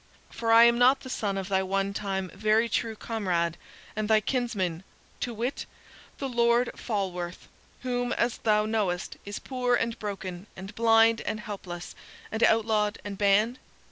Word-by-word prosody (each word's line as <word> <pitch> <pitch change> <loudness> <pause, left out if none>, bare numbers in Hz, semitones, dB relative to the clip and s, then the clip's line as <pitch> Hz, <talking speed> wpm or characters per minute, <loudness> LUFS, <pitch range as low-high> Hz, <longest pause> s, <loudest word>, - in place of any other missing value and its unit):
For 230 -1 -1
am 235 +1 +7
I - - -3
not 260 +3 +5
the 260 - -8
son 200 -5 -2
of 190 -1 -3
thy 190 -1 +2
onetime 195 0 -2
very 215 +3 +2
true 225 0 -1
comrade 180 -7 -1 0.4
and 215 0 -2
thy 220 -1 +6
kinsman 205 -8 -2 0.4
to 245 - -2
wit, 235 +4 -3 0.5
the 275 - -3
Lord 235 0 +2
Falworth, 185 -5 -4 0.3
whom, 245 -1 -1
as 235 0 0
thou 210 -1 +2
knowest, 210 -4 -1
is 205 0 -5
poor 250 -2 0
and 230 -1 -2
broken, 195 -2 -5
and 190 +3 -9
blind, 225 0 +4
and 215 - -3
helpless, 180 -4 -7 0.4
and 220 - -3
outlawed, 220 -2 +3
and 200 -1 -6
banned? 210 +5 +3
215 Hz, 155 wpm, -27 LUFS, 195-235 Hz, 0.5 s, am